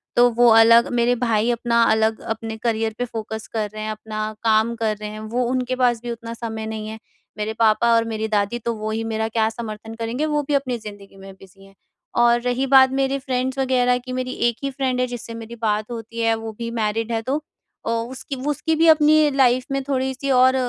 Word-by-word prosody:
तो 245 0 +6
वो 240 0 +4
अलग, 225 +1 +7
मेरे 240 +1 +2
भाई 230 -1 +2
अपना 235 0 +1
अलग 220 0 +2
अपने 225 0 -5
करियर 225 -2 0
पे 245 - -1
फ़ोकस 220 -2 -6
कर 215 -2 -1
रहे 215 0 -6
हैं। 215 - -3
अपना 215 0 -5
काम 220 +1 +2
कर 220 -2 -1
रहे 210 0 -6
हैं 215 0 -8 0.2
वो 250 - +2
उनके 255 0 -1
पास 245 -3 +1
भी 240 - -4
उतना 230 0 -7
समय 225 -1 -5
नहीं 220 -1 -5
है, 220 0 -7 0.4
मेरे 210 +1 -2
पापा 230 +1 +4
और 230 - +3
मेरी 220 -1 -3
दादी 210 +2 0
तो 235 0 -2
वो 215 0 -4
ही 225 +1 -2
मेरा 220 0 -2
क्या 220 0 +1
समर्थन 225 -1 -7
करेंगे 235 +6 -2
वो 295 -1 0
भी 295 - -1
अपनी 265 -3 0
ज़िंदगी 205 -2 -11
में 195 0 -11
बिज़ी 190 0 -18
हैं। 195 0 -19 0.4
और 240 0 +4
रही 250 +2 0
बात 265 -1 +6
मेरे 270 0 0
फ्रेंड्स 260 0 -2
वग़ैरह 250 -2 +2
की 250 +1 -9
मेरी 255 0 -3 0.2
एक 235 - -6
ही 275 - 0
फ्रेंड 260 -2 -1
है 255 - +1
जिससे 240 -1 -7
मेरी 230 0 -8
बात 215 0 0
होती 230 0 -7
है, 225 0 +3
वो 225 0 -6
भी 230 0 -3
मैरिड 225 0 -1
है 225 -1 0
तो 270 +6 -2 0.4
अ, - - -2
उसकी 240 +4 -4
उसकी 320 +3 0
भी 325 +1 +3
अपनी 310 -1 +5
लाइफ़ 255 -2 +3
में 275 0 0
थोड़ी-सी 265 0 -2
और 255 +1 +5
230 Hz, 225 wpm, -22 LUFS, 220-255 Hz, 0.4 s, अलग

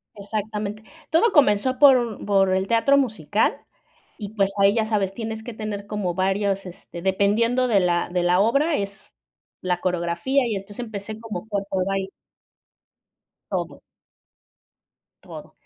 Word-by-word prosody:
Exactamente. 210 0 -4 0.3
Todo 370 +7 +3
comenzó 255 - +3
por 280 -3 +8
u 235 -4 -3
por 195 -2 +3
el 190 +1 0
teatro 255 +6 +3
musical 215 - 0 0.6
y 205 -2 -6
pues 195 -2 +1
ahí 200 0 +5
ya 225 - +1
sabes, 200 -3 -1
tienes 220 -1 -5
que 240 -1 -8
tener 210 -2 -5
como 205 -4 -2
varios 195 +1 0
este 175 -1 -10
dependiendo 215 +7 +2
de 210 -5 +3
la 175 -1 +1
de 180 -1 0
la 180 +1 +3
obra 280 +9 +2
es 200 0 -6 0.5
la 180 -1 -1
coreografía 180 +10 0
y 220 -4 -1
entonces 200 +4 -8
empecé 215 -1 -7
como 220 -4 -6
fue 205 -2 -2
por 185 -1 0
baile. 195 0 -2 1.4
Todo. - - -3 1.5
Todo. - - -11
205 Hz, 145 wpm, -23 LUFS, 195-225 Hz, 1.5 s, por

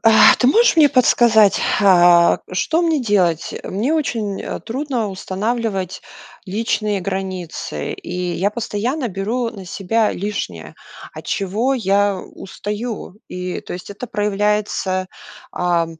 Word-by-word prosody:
А. 225 -1 +7
Ты 250 - +3
можешь 455 - +4
мне 305 -3 +7
подсказать, 230 -5 +4 0.2
а, 175 -3 +6
что 320 - +1
мне 325 -3 +1
делать? 185 -8 +1
Мне 220 +10 -1
очень 225 -10 -2 0.2
трудно 245 -1 -2
устанавливать 195 0 -3 0.4
личные 210 0 -1
границы, 185 -2 -4
и 180 0 -4
я 195 +3 0
постоянно 235 +5 -2
беру 225 +5 -2
на 200 -4 -10
себя 210 +4 0
лишнее, 180 - -5 0.4
от - - -10
чего 215 +8 0
я 200 -3 +2
устаю. 210 +1 -6
И, 180 0 -4
то - - -9
есть 180 - -9
это 205 +5 -7
проявляется, 205 -3 -1 0.5
а, 175 -1 +1
205 Hz, 120 wpm, -19 LUFS, 185-230 Hz, 0.5 s, А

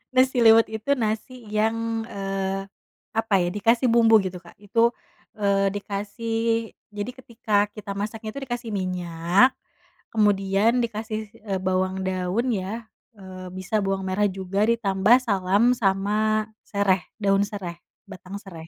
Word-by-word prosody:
Nasi 255 0 +4
liwet 225 0 +7
itu 220 +4 -6
nasi 230 +1 -3
yang, 225 +1 0
eee, 195 -1 -3 0.5
apa 225 -1 0
ya 175 - +1
dikasih 230 +6 +2
bumbu 225 -1 +6
gitu 185 -1 -4
Kak, 175 -1 -17
itu, 230 +3 +2 0.5
eee, 200 -1 +2
dikasih 205 +3 -4 0.6
jadi 205 +4 -4
ketika 235 -4 -4 0.2
kita 210 -2 -7
masaknya 215 +2 -4
itu 280 - -7
dikasih 240 -2 -4
minyak, 180 +3 +2 0.6
kemudian 205 +2 +3
dikasih, 220 -1 -4
si 230 - -19
eee, 195 -3 -2
bawang 185 0 0
daun 185 +6 -1
ya, 215 +3 -4 0.3
eee, 185 -1 -9
bisa 185 +3 -1
bawang 195 0 -1
merah 200 +2 +2
juga 190 +1 -1
ditambah 215 -1 +4
salam 200 +2 +3
sama 215 +1 +1 0.2
sereh, 195 -3 +1 0.2
daun 195 0 +3
sereh, 195 -5 -6 0.3
batang 190 0 -8
sereh. 165 -5 -10
205 Hz, 135 wpm, -24 LUFS, 190-225 Hz, 0.6 s, liwet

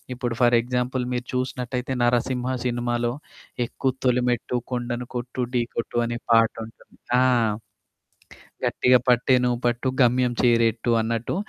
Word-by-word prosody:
ఇప్పుడు 120 -2 -3
for 120 0 +5
example 125 +1 -2
మీరు 125 0 -3
చూసినట్టయితే 125 0 -3
'నరసింహ' 125 +1 0
సినిమాలో 120 -1 -1 0.5
'ఎక్కు 130 +2 -2 0.2
తొలిమెట్టు 125 -1 +1
కొండను 120 0 -3
కొట్టు 125 +1 -3
ఢీ 120 - +3
కొట్టు' 115 0 -2
అనే 120 0 -3
పాటుంటుంది. 115 0 0 0.2
ఆ! - - +5 1.4
'గట్టిగా 125 0 +4
పట్టే 125 +1 +4
నువ్వు 120 -1 +1
పట్టు 120 +2 0
గమ్యం 125 0 +3
చేరట్టు' 115 -1 +2
అన్నట్టు 115 +5 -2
120 Hz, 120 wpm, -24 LUFS, 120-125 Hz, 1.4 s, for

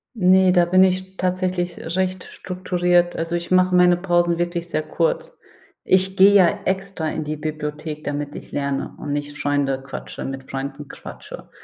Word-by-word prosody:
Ne, 185 -2 +5
da 175 -1 +4
bin 185 +2 +5
ich 190 0 0
tatsächlich 180 -1 -1 0.2
recht 185 -1 -1
strukturiert. 180 -1 0
Also, 165 +1 -2
ich 170 +1 -4
mache 185 0 +4
meine 180 0 +6
Pausen 175 -2 +1
wirklich 175 0 -2
sehr 155 - -1
kurz. - - -1 0.5
Ich 190 +1 +2
gehe 195 +2 +7
ja 200 0 +5
extra 190 -3 -2
in 155 - -3
die 150 +1 -4
Bibliothek, 150 0 -5
damit 145 0 -4
ich - - -10
lerne 140 -1 -3
und 145 - -4
nicht 145 0 -4
Freunde 140 -2 0
quatsche 135 0 -7
mit 135 0 -5
Freunden 140 +2 -5
quatsche. - - -10
175 Hz, 165 wpm, -22 LUFS, 150-185 Hz, 0.5 s, gehe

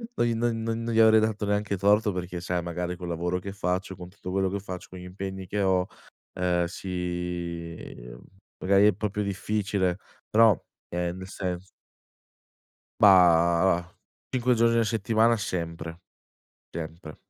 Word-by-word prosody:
no - - +2
gli 120 - +1
non 115 0 0
non 115 0 -2
non 115 0 -2
gli 115 - +3
avrei 110 0 +7
dato 110 -1 -1
neanche 105 0 0
torto, 105 +3 +3
perché 90 -1 -5
sai 90 0 -1
magari 90 +1 -4
col 90 0 -6
lavoro 85 +2 -1
che 100 +2 -7
faccio, 95 0 -2
con 90 0 -10
tutto 90 -1 -9
quello 95 0 +1
che 100 +2 -3
faccio, 90 -2 -8
con 90 - -10
gli 90 - -9
impegni 95 +1 -6
che 105 +3 -1
ho, 95 -1 +2 0.5
ehm, 90 -1 +1
si, 90 -2 -4 0.3
uhm, - - -11 0.4
magari 100 +2 +5
è 105 - +4
proprio 105 +1 -2
difficile, 100 -2 -1 0.3
però, 110 -3 +5 0.3
ehm, 90 0 -2
nel 95 0 -8
sens 90 -2 -4 1.3
Bah, 90 -2 +5 0.5
5 125 -1 +1
giorni 115 0 +3
a 115 - +3
settimana 115 +1 +2
sempre, 85 -3 -4 0.7
sempre. 80 -1 -7
95 Hz, 155 wpm, -27 LUFS, 90-105 Hz, 1.3 s, avrei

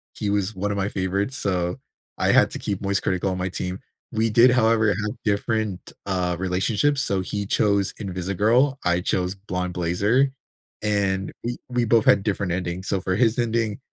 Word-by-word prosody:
he 105 - -2
was 100 +1 -1
one 100 +2 -2
of 100 - -2
my 100 0 0
favorites, 100 +7 -2
so 90 -2 -1 0.4
I - - +2
had - - +5
to - - -5
keep 100 -2 -3
Moist 100 0 0
Critical 95 +1 0
on 95 - -3
my 95 0 -2
team. 90 +1 -4 0.3
We 110 +1 +1
did, 120 +3 +6
however, 115 -2 +3
have 105 +1 -2
different, 105 -2 -1 0.2
uh, 90 -2 0
relationships. 100 +10 +1
So, 95 -5 0
he 100 +3 -3
chose 100 -1 +1
Invisigirl. 105 +8 +1
I 90 0 +2
chose 90 +1 -1
Blonde 90 -2 -4
Blazer, 100 +10 +2 0.5
and, 100 -2 0
we 120 +1 -3
we 120 -1 +1
both 115 0 +3
had 100 -1 +5
different 100 -3 -1
endings. 90 +1 -3
So 95 - 0
for 95 0 -1
his 115 +3 +2
ending, 115 -2 0
it - - -11
100 Hz, 185 wpm, -23 LUFS, 95-110 Hz, 0.5 s, did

